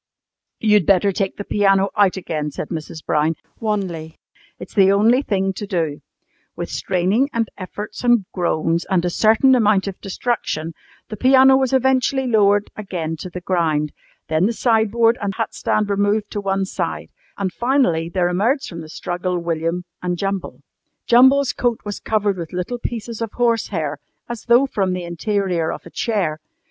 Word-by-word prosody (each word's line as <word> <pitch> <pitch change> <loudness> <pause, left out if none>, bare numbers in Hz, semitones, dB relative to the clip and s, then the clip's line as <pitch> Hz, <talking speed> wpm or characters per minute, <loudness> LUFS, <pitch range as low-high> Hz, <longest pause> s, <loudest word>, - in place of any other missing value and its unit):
"You'd 210 -5 +3
better 195 +1 +4
take 195 0 -1
out - - -41
the 205 - -4
piano 195 -1 +2
again," 180 -7 0
said 150 - -6
Mrs. 160 -1 -6
Brown 155 +2 +1 0.2
wanly. 185 -7 -3 0.4
"It's - - -10
the 195 -2 +5
only 225 +6 +4
thing 195 -6 -1
to 205 +2 -6
do." 160 -6 -2 0.5
With - - -5
straining, 195 +9 +1
and 230 -1 0
efforts, 205 +4 -7
and 240 -5 +3
groans, 170 -2 0
and 180 -3 +1
a 175 - 0
certain 225 +7 +4
amount 210 -5 +3
of 195 - -6
destruction, 185 -6 -2 0.4
the 215 - -6
piano 265 +2 +6
was 265 -1 +1
eventually 265 0 +2
lowered 205 -3 +3
again 175 -6 -4
to 180 - -7
the 180 +1 -7
ground. 160 -5 0 0.3
Then 160 +4 +2
the 235 - -1
sideboard 230 0 +2
and 200 -1 -2
hat 225 - -3
stand 210 -1 0
were 200 - 0
moved 205 +1 0
to 205 - -3
one 195 -1 0
side, - - -4 0.3
and 190 -2 -2
finally 240 -11 +1
there 180 -1 +1
emerged 220 +11 0
from 170 -2 -7
the 155 - -10
struggle 180 +2 -3
William 170 +1 -2 0.2
and 180 -1 -2
Jumble. 195 +1 -4 0.4
Jumble's 265 +2 +5
coat 240 -2 -1
was 205 -1 -5
covered 205 -3 0
with 170 -1 -7
little 180 +7 -3
pieces 230 -1 -5
of 225 -2 -3
horsehair, 200 -11 0 0.3
as 240 -2 -7
though 240 +3 +5
from 195 -8 -1
the 180 -1 -3
interior 175 -1 -1
of - - -8
a - - -11
chair. 190 -10 -1
200 Hz, 170 wpm, -20 LUFS, 175-225 Hz, 0.5 s, piano